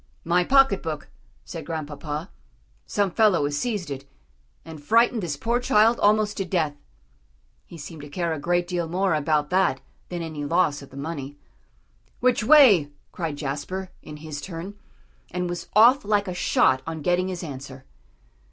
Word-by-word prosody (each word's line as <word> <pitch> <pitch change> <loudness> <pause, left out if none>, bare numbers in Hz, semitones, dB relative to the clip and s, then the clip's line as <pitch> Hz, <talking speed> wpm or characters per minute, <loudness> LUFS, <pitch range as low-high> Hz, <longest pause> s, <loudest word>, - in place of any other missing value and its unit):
"My 175 +2 +2
pocket 270 -3 +4
book," 155 -3 -5 0.4
said 165 -3 -7
Grandpapa; 150 +1 -5 0.6
"some 200 -2 0
fellow 205 -6 +3
has 145 0 -2
seized 200 -3 -2
it, 135 0 -7 0.6
and 160 -2 -10
frightened 230 +5 +3
this 160 -6 -3
poor 235 +10 0
child 230 -1 +3
almost 210 0 +2
to 195 - 0
death." 170 -5 -1 0.9
He 170 - -11
seemed 155 0 -9
to 145 - -10
care 170 +2 -2
a 155 - -4
great 175 +3 0
deal 175 -2 -2
more 185 +1 +1
about 150 0 0
that 190 +1 +2 0.3
than 175 -1 -4
any 155 -3 -5
loss 150 -1 +1
of 140 - -12
the 135 - -13
money. 145 -1 -6 0.8
"Which 250 -3 +2
way?" 220 - +6 0.2
cried 165 -4 -4
Jasper, 155 +7 -4
in 150 -1 -10
his 150 -1 -7
turn, 175 +5 -7 0.6
and 180 0 -3
was 175 0 -5
off 240 +6 +6
like 205 -1 +1
a 180 - -3
shot 130 -6 +2
on 160 -2 -5
getting 180 +2 +1
his 185 -1 -5
answer. 135 -3 -8
170 Hz, 165 wpm, -24 LUFS, 150-195 Hz, 0.9 s, way